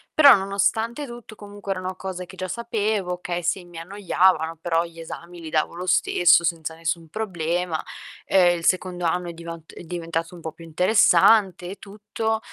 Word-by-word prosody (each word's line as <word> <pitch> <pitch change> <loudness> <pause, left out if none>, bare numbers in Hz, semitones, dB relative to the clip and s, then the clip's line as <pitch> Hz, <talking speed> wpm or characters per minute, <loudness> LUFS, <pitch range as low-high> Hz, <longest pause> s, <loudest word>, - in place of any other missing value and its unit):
Però, 285 -3 +9
nonostante 200 +6 0
tutto 240 -3 -11
comunque 205 -1 -6
erano 185 0 -4
cose 185 -1 -6
che 185 +1 -14
già 185 - -4
sapevo, 215 -3 -1
okay 175 -1 -4
sì, 180 +1 -1
mi 175 -1 -13
annoiavano, 180 -3 +1
però 170 0 +1
gli 165 0 -11
esami 170 +1 -9
li 160 - -7
davo 155 +1 0
lo 180 +1 -5
stesso 175 -1 +4
senza 160 -1 -2
nessun 165 0 -3
problema. 175 -5 -2 0.4
Ehm, 180 -2 +4
il - - -11
secondo 180 -1 0
anno 175 +1 0
è 170 - -6
divant 165 -1 -9
è - - -10
diventato 165 0 -4
un 175 - -10
po' 160 -1 -6
più 165 - -14
interessante 185 +2 +4
e - - -6
tutto. 215 +2 -3
180 Hz, 175 wpm, -23 LUFS, 165-200 Hz, 0.4 s, Però